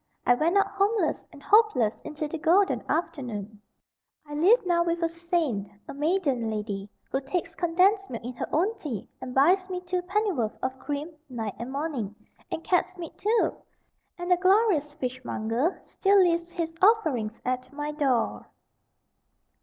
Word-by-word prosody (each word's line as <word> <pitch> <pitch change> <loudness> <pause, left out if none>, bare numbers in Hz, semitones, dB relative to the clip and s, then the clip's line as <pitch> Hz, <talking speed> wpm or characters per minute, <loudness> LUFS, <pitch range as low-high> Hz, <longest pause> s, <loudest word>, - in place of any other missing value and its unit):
I 245 - +6
went 325 +9 +2
out 400 - +5
homeless 410 +3 0
and 290 -3 -14
hopeless 420 - +3
into 305 0 -4
the 320 +2 -5
golden 370 +6 +3
afternoon. 220 - -3 0.6
I 295 - -9
live 370 +10 +4
now 345 -1 +3
with 340 0 -1
a - - +4
Saint 330 - -1 0.2
a - - -6
maiden 285 -6 0
lady, 205 -2 -4 0.2
who 270 - 0
takes 335 +4 -3
condensed 375 +4 +2
milk 230 -2 -6
in 245 +2 -5
her 240 - -4
own 385 +9 +1
tea, 250 - -5
and 250 -1 -6
buys 365 +8 +4
me 365 -1 -2
two 360 0 -2
pennyworth 365 - -1
of 260 0 -2
cream 290 +4 -4 0.2
night 225 -5 -4
and 240 +3 -5
morning. 275 -8 -3 0.4
And 325 - -3
cat's 370 +1 +1
meat, 335 -3 -7
too! 440 +3 +2 0.6
And 350 0 -3
the 360 - +6
glorious 370 -5 +3
fishmonger 255 - -2
still 400 +1 +2
leaves 340 -2 +3
his 335 -2 -3
offerings 305 - +3
at 255 0 -2
my 295 +1 -4
door. 275 -6 0
315 Hz, 160 wpm, -27 LUFS, 255-365 Hz, 0.6 s, I